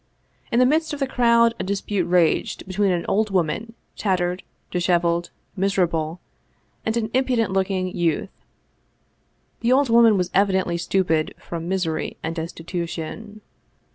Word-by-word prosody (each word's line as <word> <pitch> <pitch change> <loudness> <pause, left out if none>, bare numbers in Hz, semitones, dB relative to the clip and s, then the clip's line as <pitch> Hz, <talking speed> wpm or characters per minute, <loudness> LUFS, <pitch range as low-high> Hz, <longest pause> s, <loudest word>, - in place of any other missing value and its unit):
In 235 - +1
the 250 - +6
midst 315 +4 +1
of 295 - -4
the 275 - +1
crowd 235 -2 +3
a - - -1
dispute 195 -1 -1
raged 175 -2 +1
between 195 +1 0
an 175 -2 0
old 215 +1 +1
woman, 195 +5 -1 0.2
tattered, 180 -2 0 0.3
disheveled, 175 -1 +1 0.3
miserable, 175 -4 0 0.6
and 220 +1 -1
an 220 -1 -2
impudent 250 -6 +1
looking 190 -1 -1
youth. 170 +2 0 1.3
The 235 - +1
old 270 0 +4
woman 230 -2 +6
was 180 -1 -1
evidently 190 -3 +2
stupid 170 -3 0
from 170 -1 -6
misery 175 -4 -2
and 160 - -2
des 165 -1 -3
titution. 175 +5 -6
190 Hz, 140 wpm, -23 LUFS, 175-225 Hz, 1.3 s, the